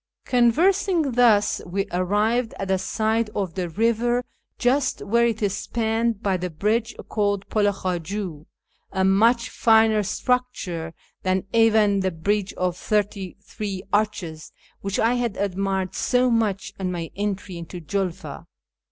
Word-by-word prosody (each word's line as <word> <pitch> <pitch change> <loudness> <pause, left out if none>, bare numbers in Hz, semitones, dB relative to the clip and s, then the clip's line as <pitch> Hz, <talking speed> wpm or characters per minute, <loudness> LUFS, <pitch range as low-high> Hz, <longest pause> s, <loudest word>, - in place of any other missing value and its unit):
" - - -50
Conversing 320 - +3
thus, 230 -4 +4
we 195 +2 -2
arrived 210 +6 +1
at 195 - -4
the 190 -1 +2
side 220 +3 0
of 190 -5 -2
the 180 -1 -3
river, 235 +5 +1 0.3
just 260 +2 +1
where 235 +3 +3
it 225 -2 -2
is 200 -1 +1
spanned 225 -1 -1
by 195 -2 +1
the 180 0 -3
bridge 215 +8 -1
called 205 -2 -1
Pul 210 -2 +2
i - - +3
Khaju, 180 -3 -4 0.4
a 190 -1 +1
much 230 +5 +3
finer 220 -1 +4
structure 195 -8 -2 0.3
than 185 0 0
even 220 -3 +4
the 190 -1 +1
bridge 200 +4 -1
of 180 -1 -1
thirty 200 -1 -1
three 200 -2 -5
arches 185 -7 -1 0.3
whicli 195 +2 -1
I 230 +2 +3
had 240 -4 -1
admired 195 -1 -1
so 250 0 +2
much 215 -4 0
on 185 -1 -1
my 170 -2 -4
entry 200 -3 -3
into 170 +2 -7
Julfa. 170 -3 -4
205 Hz, 145 wpm, -24 LUFS, 185-230 Hz, 0.4 s, thus